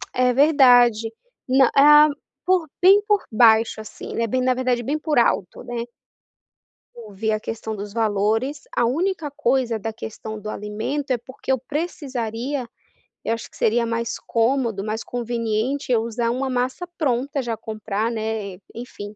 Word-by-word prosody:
É 250 Hz, 0 st, +3 dB
verdade, 245 Hz, -5 st, +5 dB, 0.4 s
não 265 Hz, -1 st, +5 dB
hã, 295 Hz, +2 st, +8 dB, 0.4 s
por 365 Hz, -3 st, +2 dB
bem 390 Hz, +3 st, +6 dB
por 415 Hz, -2 st, +2 dB
baixo 220 Hz, -1 st, +4 dB
assim, 215 Hz, -, -6 dB
eh, 230 Hz, -, +1 dB
bem 255 Hz, +4 st, 0 dB
na 255 Hz, -, +3 dB
verdade 250 Hz, -1 st, 0 dB
bem 295 Hz, +6 st, -1 dB
por 300 Hz, -3 st, -1 dB
alto, 200 Hz, -6 st, +1 dB
né. 235 Hz, -1 st, -4 dB, 1.1 s
Ouvir 220 Hz, -1 st, -4 dB
a 215 Hz, -, 0 dB
questão 220 Hz, 0 st, -5 dB
dos 205 Hz, 0 st, -7 dB
valores, 225 Hz, +5 st, 0 dB
a 240 Hz, -, +3 dB
única 320 Hz, +3 st, -1 dB
coisa 255 Hz, -5 st, 0 dB
da 225 Hz, +2 st, -4 dB
questão 220 Hz, 0 st, -7 dB
do 210 Hz, -, -9 dB
alimento 215 Hz, +8 st, -4 dB
é 250 Hz, -, +2 dB
porque 260 Hz, +3 st, -6 dB
eu 265 Hz, -, +3 dB
precisaria, 260 Hz, -3 st, -4 dB, 0.6 s
eu -, -, +1 dB
acho 230 Hz, -, -6 dB
que -, -, -17 dB
seria 235 Hz, +2 st, +2 dB
mais 230 Hz, 0 st, -2 dB
cômodo, 230 Hz, -3 st, 0 dB
mais 220 Hz, +1 st, -3 dB
conveniente 240 Hz, +2 st, -2 dB
eu 230 Hz, -2 st, +3 dB
usar 230 Hz, +1 st, -2 dB
uma 260 Hz, +2 st, -1 dB
massa 255 Hz, +7 st, -1 dB
pronta 275 Hz, 0 st, 0 dB
já 235 Hz, -3 st, -3 dB
comprar, 215 Hz, +1 st, -3 dB
né, 220 Hz, -4 st, -4 dB, 0.2 s
enfim 215 Hz, -3 st, -8 dB
235 Hz, 155 wpm, -22 LUFS, 220-270 Hz, 1.1 s, hã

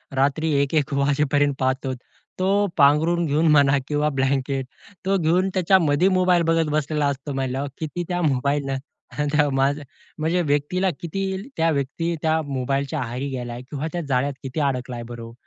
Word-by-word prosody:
रात्री 145 Hz, +4 st, +1 dB
1-1 145 Hz, 0 st, 0 dB
वाजेपर्यंत 145 Hz, 0 st, +2 dB
पाहतो 130 Hz, 0 st, 0 dB, 0.5 s
तो 200 Hz, +2 st, +2 dB
पांघरून 160 Hz, +4 st, +4 dB
घेऊन 155 Hz, +2 st, +2 dB
म्हणा 140 Hz, -2 st, +5 dB
किंवा 150 Hz, 0 st, +1 dB
ब्लँकेट 135 Hz, 0 st, 0 dB, 0.4 s
तो 195 Hz, +1 st, +2 dB
घेऊन 180 Hz, +3 st, +2 dB
त्याच्यामध्ये 180 Hz, -3 st, +3 dB
मोबाईल 185 Hz, -2 st, +3 dB
बघत 165 Hz, -1 st, +2 dB
बसलेला 150 Hz, -1 st, 0 dB
असतो 140 Hz, +1 st, -3 dB
म्हंटल्यावर 135 Hz, +1 st, -2 dB
किती 160 Hz, +3 st, -3 dB
त्या 175 Hz, 0 st, -1 dB
मोबाईलनं 140 Hz, -1 st, 0 dB, 0.8 s
माझ 135 Hz, +2 st, +2 dB, 0.4 s
म्हणजे 165 Hz, +3 st, +1 dB
व्यक्तीला, 155 Hz, +5 st, +1 dB
किती 190 Hz, +3 st, -3 dB, 0.2 s
त्या 165 Hz, 0 st, +3 dB
व्यक्ती 150 Hz, +4 st, -1 dB
त्या 160 Hz, 0 st, +2 dB
मोबाईलच्या 140 Hz, +2 st, -2 dB
आहारी 125 Hz, +2 st, -3 dB
गेला 120 Hz, -2 st, -5 dB
किंवा 145 Hz, +2 st, -3 dB
त्या 175 Hz, -, -2 dB
जाळ्यात 135 Hz, +2 st, +1 dB
किती 135 Hz, +3 st, -4 dB
अडकलाय 125 Hz, -3 st, -2 dB
बरं 120 Hz, -1 st, -7 dB
हो. 115 Hz, 0 st, -10 dB
145 Hz, 145 wpm, -23 LUFS, 135-165 Hz, 0.8 s, म्हणा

